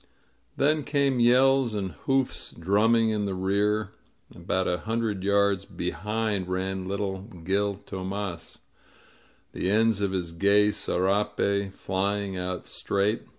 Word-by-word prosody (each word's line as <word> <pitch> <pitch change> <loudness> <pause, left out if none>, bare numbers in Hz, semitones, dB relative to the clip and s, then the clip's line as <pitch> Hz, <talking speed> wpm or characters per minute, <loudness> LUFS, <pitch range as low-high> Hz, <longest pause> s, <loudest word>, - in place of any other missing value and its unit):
Then 150 +1 +2
came 140 -3 +1
yells 125 0 +4
and 95 -3 -2
hoofs 135 - -1
drumming 110 +5 +3
in 105 -1 -1
the 95 -1 -2
rear. 100 +2 0 0.4
About 95 +2 -1
a 90 0 0
hundred 110 -2 -2
yards 100 -1 +2
behind 105 +1 -3
ran 95 0 -2
little 100 -1 -2
Gil 100 +1 -2
Tomas, 95 -2 -5 0.9
the 90 - -2
ends 110 0 +3
of 100 -1 0
his 90 -3 -2
gay 100 +4 +3
serape 100 +1 0
flying 100 +1 -2
out 90 0 -4
straight. 100 +3 -1
100 Hz, 120 wpm, -27 LUFS, 95-110 Hz, 0.9 s, yells